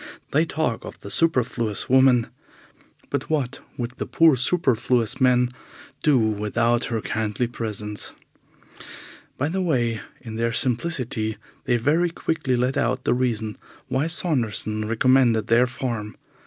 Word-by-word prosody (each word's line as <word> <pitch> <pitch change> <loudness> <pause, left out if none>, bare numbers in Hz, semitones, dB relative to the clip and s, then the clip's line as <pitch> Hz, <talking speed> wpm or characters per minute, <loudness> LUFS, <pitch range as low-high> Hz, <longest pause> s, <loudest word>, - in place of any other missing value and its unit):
They 155 +3 +3
talk 150 -8 -2
of - - -9
the 100 - -8
superfluous 120 -5 +2
woman, 130 -2 +5 0.9
but - - -2
what 140 -5 -1 0.2
would 120 -1 -3
the - - -4
poor 165 -3 +5
superfluous 125 -5 +1
man 125 -1 +4 0.5
do 150 -3 +4
without 115 +2 +1
her 115 -2 -2
kindly 110 +3 -1
presence? 105 -3 -4 1.3
By 145 - 0
the 190 +4 -1
way, 120 -10 0 0.2
in 110 -2 -8
their 115 0 0
simplicity 125 -5 -1 0.3
they 120 - +2
very 155 +9 +2
quickly 160 -5 -1
let 125 +2 0
out 125 +2 0
the - - +2
reason 115 -4 -1 0.3
why 135 +4 0
Saunderson 115 - -1
recommended 115 -1 +3
their 120 +2 +4
farm. 120 -4 -4
120 Hz, 130 wpm, -23 LUFS, 115-135 Hz, 1.3 s, woman